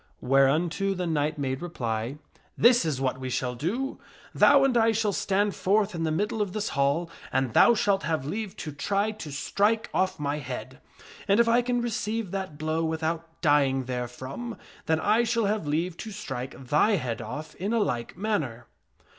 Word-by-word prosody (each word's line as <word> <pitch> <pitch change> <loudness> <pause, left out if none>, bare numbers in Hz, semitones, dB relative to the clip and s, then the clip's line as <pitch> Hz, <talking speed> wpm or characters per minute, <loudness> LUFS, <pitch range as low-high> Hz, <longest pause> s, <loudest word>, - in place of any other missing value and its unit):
" - - -37
Whereunto 160 +9 +2
the 180 -1 -2
knight 155 -1 0
made 130 -2 -2
reply, 120 -6 -3 0.2
" - - -36
This 240 -3 +5
is 150 -5 -1
what 130 -1 -1
we 130 0 -4
shall 125 0 -1
do: 210 - -3 0.3
Thou 285 -1 +6
and 270 -2 +2
I 225 -1 +4
shall 215 -2 +1
stand 200 +1 +1
forth 205 +1 +1
in 165 -1 -2
the 160 - 0
middle 210 +6 -1
of 200 -3 -2
this 215 -1 -2
hall, 140 +5 +1 0.2
and 130 -3 0
thou 235 - +6
shalt 200 -3 +2
have 155 -2 -1
leave 205 +6 -4
to 150 - -4
try 200 +8 0
to 210 -8 -8
strike 205 +10 0
off 185 -3 0
my 145 0 -1
head; 130 -1 -7 0.5
and 200 +2 +4
if 235 - +5
I 235 +1 +4
can 245 0 0
receive 225 -3 -2
that 190 -6 -4
blow 155 +2 -1
without 160 +1 -2
dying 140 -4 +3
therefrom, 130 - -5 0.3
then 160 0 +2
I 215 +7 +3
shall 230 -1 +1
have 205 -5 -1
leave 165 +4 -1
to 220 - -6
strike 130 -12 -6
thy 180 +9 +4
head 125 - -1
off 155 +1 -6
in 195 +4 -3
a 235 - +2
like 125 - -1
manner." 180 - -2
170 Hz, 190 wpm, -27 LUFS, 140-210 Hz, 0.5 s, Thou